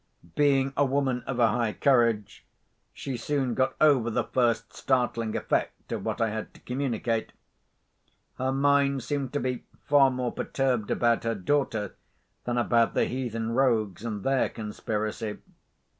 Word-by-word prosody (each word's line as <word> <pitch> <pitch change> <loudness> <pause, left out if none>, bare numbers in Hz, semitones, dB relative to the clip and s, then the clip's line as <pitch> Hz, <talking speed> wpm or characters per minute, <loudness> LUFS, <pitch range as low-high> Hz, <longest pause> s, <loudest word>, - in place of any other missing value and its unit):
Being 135 -2 +2
a - - +3
woman 135 -2 0
of 130 - -3
a 120 -2 +4
high 115 -1 0
courage, 115 -6 +2 0.5
she 135 -3 -5
soon 130 +1 -1
got 130 +2 0
over 140 -7 +4
the 110 - 0
first 115 -3 0
startling 120 -4 0
effect - - -2
of - - -3
what - - -3
I 115 -1 +1
had 110 0 -6
to - - -15
communicate. 120 -3 -2 1.1
Her 130 +1 0
mind 140 -1 +2
seemed 140 -3 -2
to 145 - 0
be 125 -1 -2 0.2
far 140 -2 +5
more 125 -2 -2
perturbed 125 -6 -1
about 120 -1 +2
her 115 0 0
daughter 105 -1 -1 0.5
than 120 0 -1
about 120 -1 +2
the - - +3
heathen 115 -3 -3
rogues 115 -6 +1
and 105 -4 -4
their 135 +2 +2
conspiracy. 110 0 -4
125 Hz, 150 wpm, -27 LUFS, 115-135 Hz, 1.1 s, far